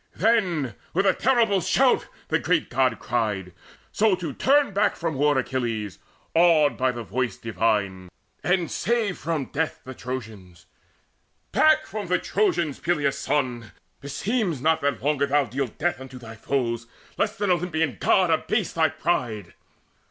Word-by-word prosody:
Then 180 Hz, -, +1 dB, 0.2 s
with 195 Hz, +3 st, +2 dB
a 190 Hz, -, +5 dB
terrible 230 Hz, -7 st, +2 dB
shout 255 Hz, +9 st, +2 dB, 0.2 s
the -, -, +2 dB
great -, -, 0 dB
God -, -, +2 dB
cried, -, -, -2 dB, 0.4 s
So 215 Hz, -3 st, +3 dB
to 170 Hz, -6 st, -5 dB
turn 280 Hz, -, +3 dB
back 200 Hz, -, +2 dB
from 165 Hz, -1 st, -2 dB
war 145 Hz, 0 st, +2 dB
Achilles 115 Hz, -7 st, -2 dB, 0.3 s
awed 160 Hz, -5 st, +4 dB
By 130 Hz, +1 st, +1 dB
the 120 Hz, -1 st, -6 dB
voice 125 Hz, +4 st, -2 dB
divine, 100 Hz, -5 st, -1 dB, 0.3 s
and 180 Hz, -1 st, +1 dB
save 225 Hz, -5 st, 0 dB
from 155 Hz, -3 st, -3 dB
death 160 Hz, +2 st, -2 dB
the 130 Hz, -, -8 dB
Trojans: 105 Hz, -10 st, -8 dB, 0.9 s
"Back 310 Hz, 0 st, +4 dB
from 210 Hz, -3 st, -5 dB
the 180 Hz, +1 st, +2 dB
Trojans, 170 Hz, -7 st, 0 dB
Peleus' 150 Hz, -5 st, 0 dB
son! 120 Hz, -7 st, -2 dB, 0.3 s
Beseems 175 Hz, -, -1 dB
not 160 Hz, +4 st, +2 dB
That 140 Hz, -3 st, -1 dB
longer 140 Hz, -1 st, +1 dB
thou 145 Hz, 0 st, +2 dB
deal 130 Hz, +3 st, -2 dB
death 150 Hz, +4 st, -2 dB
unto 130 Hz, -1 st, -9 dB
thy 115 Hz, -3 st, -10 dB
foes, 115 Hz, -1 st, -2 dB, 0.3 s
Lest -, -, -1 dB
an 205 Hz, -2 st, +1 dB
Olympian 160 Hz, -4 st, 0 dB
God 185 Hz, -4 st, +3 dB
abase 195 Hz, +5 st, 0 dB
thy 160 Hz, -1 st, +3 dB
pride." 115 Hz, -, -2 dB
150 Hz, 150 wpm, -24 LUFS, 125-180 Hz, 0.9 s, a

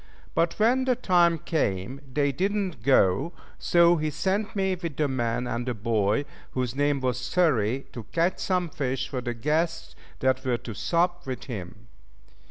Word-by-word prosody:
But 165 Hz, 0 st, +1 dB
when 245 Hz, +4 st, +3 dB
the 255 Hz, -1 st, +3 dB
time 175 Hz, -7 st, +3 dB
came 130 Hz, -, -2 dB
they 140 Hz, +1 st, +1 dB
did 190 Hz, +9 st, 0 dB
not 195 Hz, -, -2 dB
go, 130 Hz, -, +3 dB, 0.3 s
so 170 Hz, 0 st, +5 dB
he 155 Hz, 0 st, -1 dB
sent 195 Hz, +8 st, -1 dB
me 190 Hz, -1 st, +1 dB
with 170 Hz, -5 st, -5 dB
the 150 Hz, -, +2 dB
man 120 Hz, -2 st, -1 dB
and 120 Hz, +1 st, -3 dB
the 125 Hz, -, -1 dB
boy 110 Hz, +3 st, +1 dB, 0.3 s
whose 125 Hz, -2 st, -1 dB
name 145 Hz, -1 st, +1 dB
was 125 Hz, -1 st, 0 dB
Xury 130 Hz, -, +1 dB
to 120 Hz, -3 st, -8 dB
catch 170 Hz, +2 st, +1 dB
some 180 Hz, -3 st, 0 dB
fish 130 Hz, -2 st, -2 dB
for 130 Hz, -3 st, -4 dB
the 120 Hz, -1 st, -3 dB
guests 160 Hz, +6 st, -1 dB, 0.2 s
that 130 Hz, 0 st, +1 dB
were 125 Hz, -3 st, +1 dB
to 115 Hz, -1 st, -8 dB
sup 175 Hz, -, 0 dB
with 130 Hz, -1 st, -4 dB
him. 105 Hz, -2 st, -8 dB
140 Hz, 175 wpm, -26 LUFS, 120-175 Hz, 0.3 s, so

